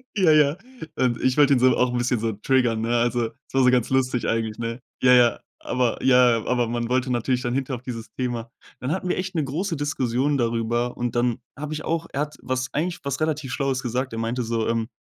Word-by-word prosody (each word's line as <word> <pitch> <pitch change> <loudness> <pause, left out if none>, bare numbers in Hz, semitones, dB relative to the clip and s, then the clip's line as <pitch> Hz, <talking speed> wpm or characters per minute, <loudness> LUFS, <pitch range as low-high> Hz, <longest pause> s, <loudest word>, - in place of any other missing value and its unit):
Ja, 185 -6 +4
ja 150 +1 +4 0.4
und 120 -2 +1
ich 130 +2 +2
wollte 145 -1 +6
ihn 125 - +3
so, 130 -1 +5
auch 125 0 +2
'n 125 - -1
bisschen 120 -1 0
so 110 0 -1
triggern, 115 +1 +1
ne? 120 +1 +1
Also, 120 -1 0 0.2
so 135 - +1
war's 125 -1 +5
ganz 125 -2 +2
lustig 130 -2 +1
eigentlich, 115 -1 -1
ne? 115 +1 -3 0.2
Ja, 125 0 +6
ja 120 -1 +5 0.2
aber 125 -2 -1
ja, 125 -2 +5
ja. - - -9
Aber 125 -2 +1
man 120 0 -2
wollte 130 +1 +1
natürlich 125 +1 0
dann 120 0 -2
hinterher 130 -1 -2
auf 120 - -14
dieses 115 -3 -6
Thema 120 -2 -3 0.3
dann 130 - -3
hatten 185 +1 -2
wir - - 0
echt 185 +1 -3
'ne 160 -3 0
große 165 +7 -2
Diskussion 140 -1 0
darüber 120 0 0
und 120 0 -2
dann 120 -1 +1 0.2
habe 150 +2 -5
ich 155 - -5
auch 165 0 -2
er 140 - -2
hat 150 0 -4
was 130 0 -2
eigentlich 170 +4 -1
was 140 0 -3
relativ 155 -4 -1
Schlaues 135 -2 -1
gesagt. 125 +1 -2
Er 115 - -3
meinte 115 +2 -1
so: 115 -1 -1
„Ähm, 115 -1 0
125 Hz, 235 wpm, -24 LUFS, 120-140 Hz, 0.4 s, wollte